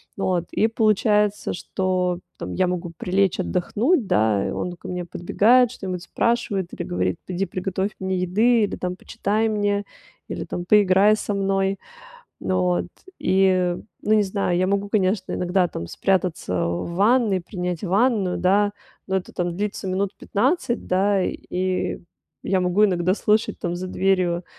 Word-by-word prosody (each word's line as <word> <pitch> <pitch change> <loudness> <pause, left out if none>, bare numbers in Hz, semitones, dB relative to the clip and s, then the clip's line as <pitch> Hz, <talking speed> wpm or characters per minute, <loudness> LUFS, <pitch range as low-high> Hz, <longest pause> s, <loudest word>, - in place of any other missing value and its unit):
Вот. 180 -3 0
И 220 - +2
получается, 210 -2 +2
что 180 -1 -1 0.2
там - - -6
я 185 - +2
могу 180 -1 -3
прилечь 190 +1 +1
отдохнуть, 220 - +1
да, 105 - +2
и - - -3
он 180 - -3
ко - - -11
мне 180 -1 -4
подбегает, 230 +8 +3
что-нибудь 185 -6 -5
спрашивает 200 -3 -1
или - - -6
говорит: 90 0 -1
"Иди 185 +1 -1
приготовь 190 +2 -2
мне 190 0 -1
еды!" 215 +6 +3
Или 205 - -1
там: 180 0 -3
"Почитай 215 +4 -1
мне!" 205 -1 0 0.4
Или - - -4
там: 175 - -5
"Поиграй 205 +1 +5
со 210 - -3
мной!" 195 0 0 0.6
Н - - -2
вот. 180 -1 +1 0.3
И 185 -2 +2 0.3
ну, 215 - +1
не 215 -1 +5
знаю, 190 -2 -1
я 185 +1 +2
могу, 200 0 0
конечно, 195 -1 0
иногда 180 +1 +1
там 85 - -6
спрятаться 180 - -1
в 85 - -3
ванной, 210 0 +3
принять 180 -1 -4
ванную, 200 0 +1
да, 200 +3 +3 0.4
но 190 - +1
это 190 - -4
там 175 -1 -2
длится 205 -1 -3
минут 190 +1 0
15, 250 - 0
да, 195 +2 +2
и 185 +1 -2 0.4
я 190 -1 +1
могу 180 +3 +3
иногда 185 -2 +2
слышать 215 +1 +1
там 175 0 -3
за 185 +1 -4
дверью, 180 -2 +1
190 Hz, 155 wpm, -23 LUFS, 180-205 Hz, 0.6 s, Поиграй